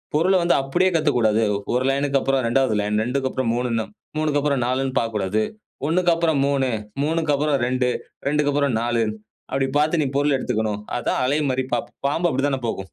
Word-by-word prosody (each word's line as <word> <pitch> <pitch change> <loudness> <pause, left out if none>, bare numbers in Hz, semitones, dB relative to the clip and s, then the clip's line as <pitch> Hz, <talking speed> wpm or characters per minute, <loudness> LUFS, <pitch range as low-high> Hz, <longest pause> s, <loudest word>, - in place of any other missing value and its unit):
பொருள 185 +5 +3
வந்து 175 - +3
அப்படியே 175 +8 +1
கத்துக்கக்கூடாது. 120 -8 +2 0.3
ஒரு 125 +1 +1
லைன்க்கு 140 0 +1
அப்றம் 135 -2 +1
2வது 130 0 +2
லைன், 105 +1 0
2க்கப்புறம் 130 -1 -1
3ன்னு, 120 -2 0 0.3
3க்கு 155 -2 +1
அப்புறம் 140 -3 +1
4ன்னு 130 +1 -1
பாக்கக்கூடாது. 110 -2 -1 0.5
1க்கு 175 +2 +2
அப்புறம் 165 -3 +1
3 140 -2 +1 0.4
3க்கு 160 0 0
அப்புறம் 145 0 +1
2 125 0 +1 0.4
2க்கு 145 0 +2
அப்புறம் 140 -4 +1
4 120 0 0 0.5
அப்படி 135 0 +1
பாத்து 155 +3 +2
நீ - - +1
பொருள் 145 0 +2
எடுத்துக்கணும். 110 -4 -1 0.2
அதான் 120 - -1
அலை 140 +4 +1
மாரி 130 0 0
பாப் - - -4 0.2
பாம்பு 165 +5 +1
அப்படித்தானே 135 0 0
போகும். 110 - -2
135 Hz, 165 wpm, -22 LUFS, 120-150 Hz, 0.5 s, பொருள